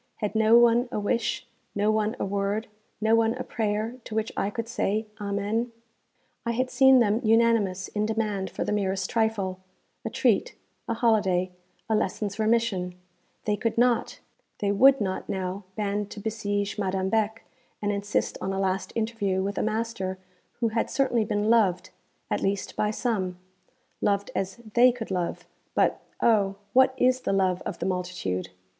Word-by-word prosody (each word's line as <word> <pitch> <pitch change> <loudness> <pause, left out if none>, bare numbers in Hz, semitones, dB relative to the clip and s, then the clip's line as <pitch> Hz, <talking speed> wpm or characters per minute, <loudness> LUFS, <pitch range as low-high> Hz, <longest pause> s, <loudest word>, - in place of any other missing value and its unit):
Had 210 -2 -3
no 220 +1 +5
one 240 +1 +4
a - - -1
wish, 220 +2 -1 0.3
no 205 +1 +2
one 215 +1 0
a - - 0
word, 200 +2 -1 0.3
no 220 +1 +2
one 225 +1 +3
a 255 - -4
prayer 220 +2 -2
to 215 - -6
which 220 0 -1
I 200 - 0
could 230 +1 -4
say 220 -2 -1 0.2
Amen? 205 +4 -1 0.7
I 235 - -1
had 255 +2 -1
seen 265 -1 +6
them 225 -1 +3
unanimous 220 -4 +3
in 210 0 -1
demand 215 -3 -1
for - - -3
the - - -2
merest 190 -2 -1
trifle 215 -5 0 0.4
a - - -3
treat, - - +1 0.3
a 230 - -1
holiday, 195 -6 +2 0.4
a 220 - 0
lesson's 205 0 -2
remission; 215 -5 +1 0.5
they 210 - +2
could 225 +2 -2
not, 240 0 +2 0.4
they 200 -2 0
would 265 +7 +6
not 190 -2 -2
now 190 +1 -3
band 205 -1 -2
to 210 - -8
besiege 205 -1 -2
Madame 190 -1 0
Beck, 220 +1 0 0.4
and 205 0 0
insist 205 +1 -1
on 195 - -2
a 195 - -2
last 190 -1 -1
interview 220 -4 0
with 200 +1 -2
a - - +1
master 215 -4 -2 0.4
who 230 - +3
had 225 +1 -1
certainly 245 -5 +1
been 210 -1 0
loved, 205 -6 +2 0.4
at - - 0
least 195 0 -1
by 210 - +1
some 205 -5 -1 0.6
loved 200 0 +1
as 190 0 -2 0.2
they 250 +1 +7
could 235 -4 -7
love; 180 -2 -2 0.3
but, - - +2 0.2
oh! 205 -4 +3 0.2
what 260 0 +5
is 255 0 +3
the - - -1
love 185 -2 +1
of - - -4
the - - -4
multitude? 180 - -2
210 Hz, 170 wpm, -26 LUFS, 195-230 Hz, 0.7 s, they